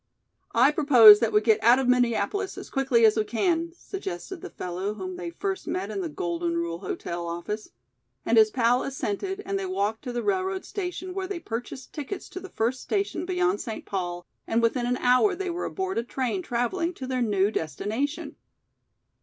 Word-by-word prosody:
"I 255 +5 +6
propose 245 -9 +8
that 230 -2 +1
we 210 - +4
get 220 0 +3
out 240 +3 +7
of 265 -1 0
Minneapolis 250 - +1
as - - -9
quickly 265 -4 +3
as 220 0 +4
we 215 - +3
can," 330 - 0
suggested 375 - -6
the - - -7
fellow 185 +4 -4
whom 185 -3 -5
they 175 -1 -5
first 190 +3 -4
met 195 +3 -2
in 200 -2 -3
the 170 - -3
"Golden 170 +2 -2
Rule 170 0 -2
Hotel" 175 -2 -4
office, 175 +6 -5 0.6
and 230 - +2
his 220 -1 +7
pal 245 +1 +2
assented 280 - -3
and 390 +1 -1
they 390 - -3
walked 220 - -1
to 250 - -3
the 240 0 -3
railroad 380 -1 -1
station 365 -1 -5
where 380 0 -3
they 385 -3 -4
purchased 245 -1 -6
tickets 305 +6 -6
to 370 - -7
the 380 - -10
first 240 +3 -1
station 395 -3 -2
beyond 370 +2 +1
St. 225 -5 -6
Paul 175 -2 -4 0.2
and 225 - +2
within 240 +1 +1
an 250 +1 0
hour 250 +12 +4
they 375 0 -3
were 350 +2 -3
aboard 380 - -2
a - - -2
train 260 +7 -2
traveling 335 +6 -1
to 260 - -6
their 255 -1 -1
new 205 -3 +2
destination. 220 - -3
245 Hz, 195 wpm, -26 LUFS, 205-345 Hz, 0.6 s, propose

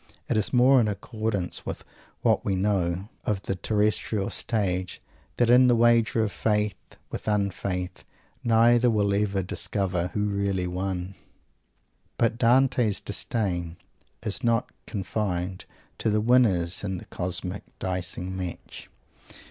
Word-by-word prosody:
It - - 0
is 110 -1 +1
more 130 +1 +6
in 110 - +1
accordance 105 -2 -3
with - - -5 0.4
what - - +3
we 95 - 0
know 95 -1 0 0.2
of 100 -2 -1
the - - -2
terrestrial 105 0 0
stage 95 -6 -1 0.4
that 120 - +3
in 125 +1 +7
this 120 - +5
wager 115 -1 +4
of 105 - -1
faith 105 -1 0 0.4
with - - -6
un 100 -2 +1
faith 90 0 -4 0.4
neither 120 +1 +5
will 105 -3 +2
ever 100 -1 0
discover 90 -1 -1
who 105 0 +1
really 100 -2 0
won! 90 +1 -3 1.0
But 115 0 +1
Dante's 125 -3 +3
"Disdain" 90 -5 -2 0.5
is 110 +3 -2
not 115 -1 +1 0.2
confined 95 -3 -3 0.3
to - - +1
the 105 0 +2
winners 105 -8 +3
in 95 -2 -2
the - - -10
cosmic 90 +2 -3 0.2
dicing 90 0 -3
match. 90 -2 -7
100 Hz, 130 wpm, -26 LUFS, 95-115 Hz, 1.0 s, in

